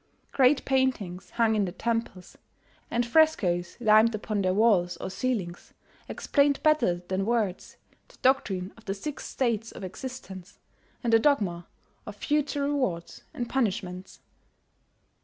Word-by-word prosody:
Great 270 Hz, +1 st, +3 dB
paintings 210 Hz, -10 st, 0 dB
hung 230 Hz, -2 st, +3 dB
in 205 Hz, -2 st, +2 dB
the 180 Hz, -, -4 dB
temples, 225 Hz, -3 st, -3 dB, 0.5 s
and 240 Hz, +1 st, 0 dB
frescoes 225 Hz, -, +2 dB
limned 220 Hz, 0 st, +5 dB
upon 210 Hz, -1 st, -2 dB
their 185 Hz, -1 st, +1 dB
walls 195 Hz, -4 st, +3 dB
or -, -, -6 dB
ceilings, 200 Hz, -8 st, -3 dB, 0.3 s
explained 280 Hz, -1 st, +1 dB
better 305 Hz, -, +2 dB
than 190 Hz, +1 st, -1 dB
words 215 Hz, -4 st, -2 dB, 0.3 s
the -, -, -21 dB
doctrine 200 Hz, -8 st, +1 dB
of 225 Hz, -, -19 dB
the 195 Hz, -, -2 dB
Six 285 Hz, +9 st, -6 dB
States 230 Hz, -3 st, -1 dB
of -, -, -10 dB
Existence, 195 Hz, -3 st, -8 dB, 0.5 s
and 235 Hz, -1 st, +1 dB
the 225 Hz, -, +7 dB
dogma 200 Hz, -, +1 dB, 0.4 s
of 210 Hz, -, -7 dB
future 290 Hz, +4 st, -1 dB
rewards 255 Hz, -13 st, -2 dB
and 240 Hz, -, -4 dB
punishments. 190 Hz, -8 st, -3 dB
220 Hz, 135 wpm, -27 LUFS, 185-260 Hz, 0.5 s, the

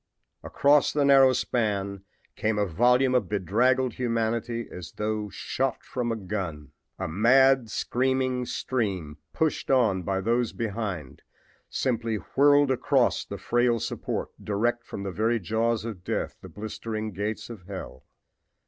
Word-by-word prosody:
Across 145 Hz, 0 st, +3 dB
the 145 Hz, -1 st, +2 dB
narrow 135 Hz, -1 st, +7 dB
span 100 Hz, -6 st, -1 dB, 0.3 s
came 110 Hz, -1 st, 0 dB
a 105 Hz, -, +2 dB
volume 125 Hz, +8 st, +3 dB
of 125 Hz, -, +1 dB
bedraggled 120 Hz, +6 st, +2 dB
humanity 115 Hz, -1 st, -1 dB
as 90 Hz, -2 st, -8 dB
though 105 Hz, 0 st, -2 dB
shot 130 Hz, +4 st, -2 dB
from 120 Hz, -2 st, -3 dB
a -, -, 0 dB
gun. 90 Hz, -8 st, -5 dB, 0.3 s
A -, -, -3 dB
mad, 125 Hz, +7 st, +4 dB
screaming 130 Hz, +1 st, 0 dB
stream, 95 Hz, -, -2 dB
pushed 160 Hz, -1 st, -1 dB
on 115 Hz, -8 st, +3 dB
by 95 Hz, +2 st, -1 dB
those 115 Hz, +3 st, 0 dB
behind, 100 Hz, -, -4 dB, 0.5 s
simply 115 Hz, -3 st, -1 dB
whirled 145 Hz, +5 st, +3 dB
across 130 Hz, -, +2 dB
the -, -, -7 dB
frail 120 Hz, -1 st, +1 dB
support, -, -, -3 dB
direct 120 Hz, +4 st, 0 dB
from 100 Hz, -, -7 dB
the 100 Hz, -, -3 dB
very 115 Hz, +4 st, +1 dB
jaws 110 Hz, +3 st, 0 dB
of 105 Hz, -6 st, -6 dB
death, -, -, -2 dB
the -, -, -10 dB
blistering 110 Hz, +1 st, -5 dB
gates 105 Hz, +5 st, -4 dB
of 95 Hz, -6 st, -11 dB
hell. 95 Hz, -9 st, -8 dB
115 Hz, 140 wpm, -26 LUFS, 100-125 Hz, 0.5 s, narrow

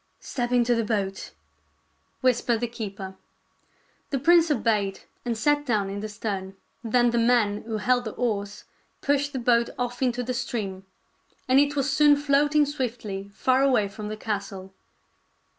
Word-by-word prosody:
" -, -, -44 dB
Step 245 Hz, -1 st, -1 dB
into 245 Hz, -1 st, +3 dB
the 230 Hz, -1 st, +1 dB
boat," 200 Hz, -3 st, -2 dB, 0.9 s
whispered 240 Hz, -2 st, +2 dB
the 240 Hz, -, -1 dB
keeper. 200 Hz, -4 st, -7 dB, 0.9 s
The 275 Hz, -, 0 dB
prince 335 Hz, +4 st, +5 dB
obeyed, 215 Hz, -7 st, 0 dB, 0.2 s
and 235 Hz, -2 st, -1 dB
sat 290 Hz, +5 st, +2 dB
down 210 Hz, -7 st, 0 dB
in 200 Hz, -, -4 dB
the 215 Hz, +1 st, -5 dB
stern. 200 Hz, -3 st, -4 dB, 0.3 s
Then 240 Hz, +1 st, +3 dB
the 235 Hz, -, +1 dB
man 230 Hz, -3 st, +2 dB
who 220 Hz, -2 st, -2 dB
held 245 Hz, +4 st, +1 dB
the 220 Hz, -, -4 dB
oars 205 Hz, -4 st, -2 dB, 0.4 s
pushed 285 Hz, 0 st, +1 dB
the 270 Hz, -, -4 dB
boat 235 Hz, -1 st, +2 dB
off 245 Hz, 0 st, -3 dB
into 250 Hz, -1 st, +1 dB
the 250 Hz, +1 st, -3 dB
stream, 205 Hz, -6 st, -4 dB, 0.6 s
and 260 Hz, +1 st, +5 dB
it 290 Hz, +1 st, +2 dB
was 275 Hz, -1 st, +1 dB
soon 295 Hz, 0 st, +6 dB
floating 290 Hz, +1 st, +3 dB
swiftly 230 Hz, -8 st, -4 dB
far 260 Hz, 0 st, +2 dB
away 255 Hz, -7 st, +3 dB
from 210 Hz, +1 st, -7 dB
the 215 Hz, 0 st, -5 dB
castle. 195 Hz, -3 st, -5 dB
235 Hz, 160 wpm, -25 LUFS, 205-260 Hz, 0.9 s, soon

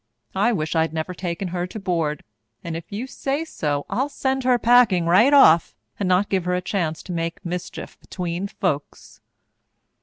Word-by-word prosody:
I 205 Hz, +5 st, +2 dB
wish 155 Hz, -6 st, -2 dB
I'd 160 Hz, 0 st, +1 dB
never 160 Hz, +3 st, -3 dB
taken 180 Hz, +1 st, -4 dB
her 175 Hz, 0 st, -3 dB
to 215 Hz, -, -7 dB
board, 165 Hz, -6 st, -1 dB, 0.4 s
and 170 Hz, -1 st, -4 dB
if 165 Hz, 0 st, -8 dB
you 215 Hz, +5 st, -4 dB
say 275 Hz, +3 st, -3 dB
so, 145 Hz, -, -2 dB
I'll 260 Hz, +8 st, -1 dB
send 265 Hz, -2 st, -2 dB
her 250 Hz, -1 st, +4 dB
packing 235 Hz, -8 st, +4 dB
right 195 Hz, +11 st, +5 dB
off 170 Hz, -, +6 dB, 0.2 s
and 195 Hz, -3 st, 0 dB
not 185 Hz, +3 st, +3 dB
give 190 Hz, -3 st, -1 dB
her 180 Hz, 0 st, +1 dB
a -, -, 0 dB
chance 170 Hz, -4 st, -2 dB
to -, -, -8 dB
make 165 Hz, 0 st, -4 dB
mischief 175 Hz, 0 st, -6 dB
atween 180 Hz, +1 st, -4 dB
folks." 150 Hz, -8 st, -4 dB
180 Hz, 180 wpm, -23 LUFS, 165-215 Hz, 0.4 s, off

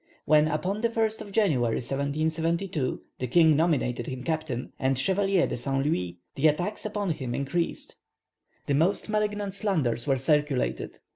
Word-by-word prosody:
When 155 Hz, 0 st, +5 dB
upon 180 Hz, +7 st, -1 dB
the 235 Hz, -, +2 dB
1st 220 Hz, -1 st, 0 dB
of 205 Hz, -2 st, -8 dB
January, 150 Hz, -, +2 dB
1772, 155 Hz, +3 st, -1 dB, 0.2 s
the 125 Hz, -, -2 dB
king 160 Hz, +4 st, +5 dB
nominated 140 Hz, -7 st, +1 dB
him 130 Hz, -1 st, -5 dB
captain, 155 Hz, -6 st, -3 dB
and 130 Hz, 0 st, +1 dB
Chevalier 190 Hz, +5 st, +2 dB
de -, -, -3 dB
Saint 135 Hz, +2 st, -1 dB
Louis, 90 Hz, -, -1 dB, 0.2 s
the 145 Hz, +3 st, +3 dB
attacks 180 Hz, +8 st, -1 dB
upon 205 Hz, -3 st, -2 dB
him 130 Hz, -6 st, -3 dB
increased. 165 Hz, +5 st, -2 dB, 0.7 s
The 145 Hz, -, 0 dB
most 170 Hz, +10 st, +1 dB
malignant 210 Hz, -2 st, -1 dB
slanders 155 Hz, -, 0 dB
were 135 Hz, -1 st, +3 dB
circulated. 150 Hz, -1 st, 0 dB
155 Hz, 150 wpm, -27 LUFS, 135-195 Hz, 0.7 s, When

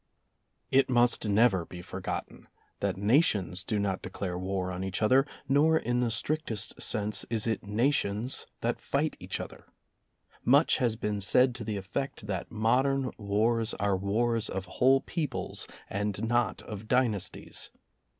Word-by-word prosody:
It 135 Hz, 0 st, +4 dB
must 120 Hz, -2 st, +3 dB
never 100 Hz, -3 st, +4 dB
be 90 Hz, +1 st, -10 dB
forgotten -, -, -6 dB, 0.3 s
that -, -, -1 dB
nations 100 Hz, -, +2 dB
do 105 Hz, +1 st, -1 dB
not 100 Hz, -2 st, -1 dB
declare 90 Hz, -1 st, -4 dB
war 95 Hz, 0 st, -2 dB
on 90 Hz, +1 st, -4 dB
each 95 Hz, -1 st, -2 dB
other, 130 Hz, +6 st, +4 dB, 0.2 s
nor 150 Hz, +4 st, +4 dB
in 120 Hz, -4 st, 0 dB
the 120 Hz, -1 st, +1 dB
strictest 115 Hz, -2 st, -2 dB
sense 105 Hz, -1 st, 0 dB
is 115 Hz, -2 st, 0 dB
it 110 Hz, -2 st, 0 dB
nations 115 Hz, 0 st, +1 dB
that -, -, -1 dB
fight -, -, -1 dB
each -, -, -4 dB
other. -, -, -9 dB, 0.8 s
Much 140 Hz, +6 st, +5 dB
has 120 Hz, -3 st, +1 dB
been 105 Hz, -2 st, -2 dB
said 125 Hz, +6 st, +4 dB
to 120 Hz, -2 st, -7 dB
the 105 Hz, -1 st, -3 dB
effect 105 Hz, +4 st, -4 dB
that 95 Hz, -4 st, -4 dB
modern 125 Hz, +4 st, +1 dB
wars 110 Hz, +2 st, +1 dB
are 100 Hz, -1 st, +1 dB
wars 110 Hz, +4 st, 0 dB
of 95 Hz, 0 st, -4 dB
whole 130 Hz, +7 st, +3 dB
peoples 160 Hz, -4 st, -3 dB, 0.2 s
and 105 Hz, +2 st, -2 dB
not 120 Hz, -2 st, 0 dB
of 105 Hz, 0 st, -8 dB
dynasties. 120 Hz, -6 st, -1 dB
110 Hz, 150 wpm, -29 LUFS, 100-125 Hz, 0.8 s, Much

